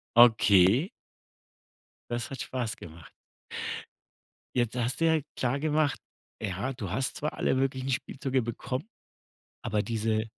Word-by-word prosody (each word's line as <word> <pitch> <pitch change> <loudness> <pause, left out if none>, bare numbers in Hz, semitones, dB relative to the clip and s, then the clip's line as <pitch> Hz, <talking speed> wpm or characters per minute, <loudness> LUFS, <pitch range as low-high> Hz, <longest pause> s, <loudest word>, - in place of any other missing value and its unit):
Okay. 110 - +6 1.2
Das 120 -1 -2
hat 135 - -5
Spaß 120 -4 -3
gemacht. 80 -1 -12 1.5
Jetzt 120 -1 +1
hast 125 +3 -1
du 165 - +3
ja 160 -1 +4 0.2
klar 130 +2 0
gemacht: 150 -1 +1 0.4
Ja, 105 +5 -2
du 110 -7 -5
hast 130 +5 -1
zwar 150 - -2
alle - - +1
möglichen 130 0 0
Spielzeuge 130 0 -1
bekommen, 125 +5 -3 0.8
aber 105 -3 0
diese 110 -1 0
125 Hz, 120 wpm, -29 LUFS, 110-135 Hz, 1.5 s, Okay